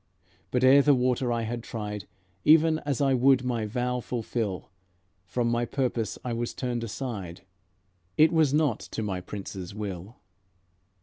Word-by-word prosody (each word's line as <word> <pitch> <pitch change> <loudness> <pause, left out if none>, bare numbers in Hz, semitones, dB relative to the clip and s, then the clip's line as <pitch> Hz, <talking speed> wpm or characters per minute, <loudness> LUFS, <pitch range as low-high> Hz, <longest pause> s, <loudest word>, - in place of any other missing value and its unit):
But 125 0 0
ere 135 +2 +7
the 145 0 +5
water 125 0 +1
I 115 -1 0
had 120 +1 -3
tried, 105 -3 -6 0.4
Even 160 +1 +5
as 140 -1 0
I 135 -1 +3
would 130 0 +4
my 120 -4 -1
vow 125 +3 -1
fulfill, 115 -5 -3 0.6
From 120 +1 -1
my 120 0 +1
purpose 120 -3 -2
I 120 - -2
was 120 +1 -3
turned 120 -2 -2
aside; 105 -7 -5 0.8
It 155 +1 +6
was 160 -4 +4
not 150 -6 +2
to 110 - -5
my 95 -3 -3
Prince's 95 -1 -7
will. 100 0 -6
120 Hz, 150 wpm, -27 LUFS, 105-130 Hz, 0.8 s, ere